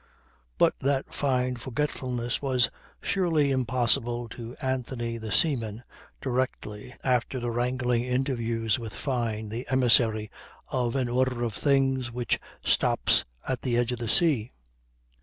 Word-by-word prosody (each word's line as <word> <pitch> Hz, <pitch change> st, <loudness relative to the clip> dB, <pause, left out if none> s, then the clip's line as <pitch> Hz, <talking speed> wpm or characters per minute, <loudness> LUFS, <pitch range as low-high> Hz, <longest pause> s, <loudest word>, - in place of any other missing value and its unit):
But -, -, +5 dB
that 135 Hz, 0 st, 0 dB
fine 125 Hz, -2 st, 0 dB
forgetfulness 125 Hz, -2 st, -2 dB
was 130 Hz, -4 st, +2 dB, 0.3 s
surely 165 Hz, -7 st, +2 dB
impossible 120 Hz, -1 st, +1 dB
to 115 Hz, +2 st, -8 dB
Anthony 125 Hz, -3 st, -2 dB
the 110 Hz, -1 st, -5 dB
seaman 115 Hz, -, +1 dB, 0.4 s
directly 125 Hz, -3 st, -3 dB
after 125 Hz, 0 st, +1 dB
the 120 Hz, -1 st, -2 dB
wrangling 125 Hz, 0 st, 0 dB
interview 120 Hz, -3 st, -1 dB
with 115 Hz, -3 st, -6 dB
Fyne 115 Hz, -6 st, -2 dB
the 115 Hz, +4 st, -5 dB
emissary 115 Hz, -4 st, +3 dB, 0.4 s
of 125 Hz, -2 st, 0 dB
an 130 Hz, -2 st, +1 dB
order 125 Hz, 0 st, +1 dB
of 115 Hz, -3 st, -1 dB
things 135 Hz, -1 st, +2 dB
which 120 Hz, -1 st, 0 dB, 0.2 s
stops -, -, +3 dB, 0.2 s
at 130 Hz, -2 st, -1 dB
the 120 Hz, -3 st, 0 dB
edge 120 Hz, 0 st, +2 dB
of 125 Hz, -, -3 dB
the 115 Hz, -2 st, -3 dB
sea. 125 Hz, -3 st, +2 dB
125 Hz, 130 wpm, -27 LUFS, 115-130 Hz, 0.4 s, But